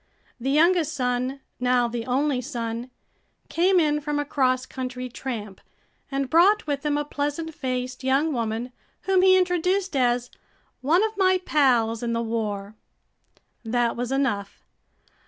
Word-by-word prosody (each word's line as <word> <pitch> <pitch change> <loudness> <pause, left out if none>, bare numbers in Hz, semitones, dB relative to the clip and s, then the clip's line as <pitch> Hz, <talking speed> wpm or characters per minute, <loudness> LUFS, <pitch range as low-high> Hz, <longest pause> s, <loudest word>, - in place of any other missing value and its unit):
The 260 +3 -2
youngest 315 +1 +3
son, 255 +1 -1 0.2
now 250 -1 +2
the 235 0 -5
only 265 +1 +1
son, 235 -2 -4 0.6
came 365 +2 +3
in 300 -2 +1
from 295 0 -2
a 290 - -1
cross 255 -2 +1
country 255 -1 -5
tramp 225 -6 -6 0.5
and 275 -1 -1
brought 365 +8 +4
with 285 -2 -2
him 295 -1 +1
a 295 - -1
pleasant 295 +3 -3
faced 255 -2 -4
young 275 +4 +2
woman 230 0 -2 0.3
whom 380 -1 +2
he 375 0 +6
introduced 365 0 +1
as 245 -1 +1 0.5
"one 325 +9 +3
of 440 0 -1
my 375 -1 +3
pals 235 -6 +2
in 235 -1 -2
the 230 - 0
war." 210 -3 -3 0.9
That 235 +1 0
was 245 +1 -3
enough. 225 -8 -1
265 Hz, 145 wpm, -24 LUFS, 240-305 Hz, 0.9 s, he